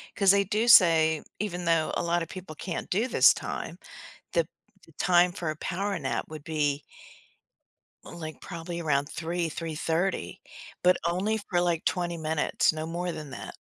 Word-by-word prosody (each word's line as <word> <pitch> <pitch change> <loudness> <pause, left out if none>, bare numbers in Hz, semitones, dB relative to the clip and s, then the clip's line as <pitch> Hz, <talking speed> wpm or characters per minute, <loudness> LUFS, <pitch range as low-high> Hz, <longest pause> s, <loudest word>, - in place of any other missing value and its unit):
'cause 195 -2 +5
they 200 0 +4
do 215 +4 0
say 160 -7 +6 0.2
even 180 -4 -3
though 165 -2 +2
a - - -1
lot 170 0 +1
of - - -9
people 185 -4 -8
can't 170 +2 -5
do 215 +7 +1
this - - +6
time, - - -5 0.6
the - - +2 0.4
the - - -20
time 180 0 +4
for 170 -2 -4
a 155 - -2
power 195 +4 -2
nap 135 -2 -2
would 155 -2 -8
be 145 -2 -1 1.2
like 155 -2 -8
probably 170 -1 -6
around 145 -3 +1
3, 170 +1 -2
3:30, 165 +3 -2 0.4
but 180 0 +6
only 190 +6 0
for 175 -2 +2
like 175 -2 0
20 175 -1 -1
minutes, 160 -1 +1
no 155 0 -4
more 175 +2 -3
than 150 -2 -7
that. - - -8
170 Hz, 165 wpm, -28 LUFS, 160-180 Hz, 1.2 s, say